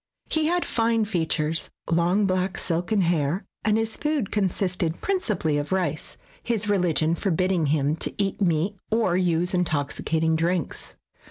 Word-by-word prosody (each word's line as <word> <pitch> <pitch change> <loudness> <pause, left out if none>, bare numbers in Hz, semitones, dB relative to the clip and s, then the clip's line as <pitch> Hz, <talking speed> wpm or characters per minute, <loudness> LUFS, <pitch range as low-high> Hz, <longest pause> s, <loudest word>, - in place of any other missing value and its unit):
He 315 -1 +2
had 350 +1 +1
very - - -7
fine 230 -1 +2
features, 160 -4 -1 0.2
long 175 +5 +2
black 185 0 0
silken 180 +5 0
hair, 170 +1 0 0.2
and 215 -1 +3
his 225 0 -1
food 295 -8 -1
consisted 185 -4 0
principally 210 - 0
of 145 - -5
rice, 175 -5 -2 0.2
his 225 -3 -1
religion 175 -5 +2
forbidding 185 -2 +1
him 145 0 +1
to - - -2
eat 200 0 -1
meat 175 +2 +1
or 220 -5 +2
use 180 -1 +1
intoxicating 160 -1 0
drinks. 170 0 -2
180 Hz, 145 wpm, -25 LUFS, 160-210 Hz, 0.2 s, and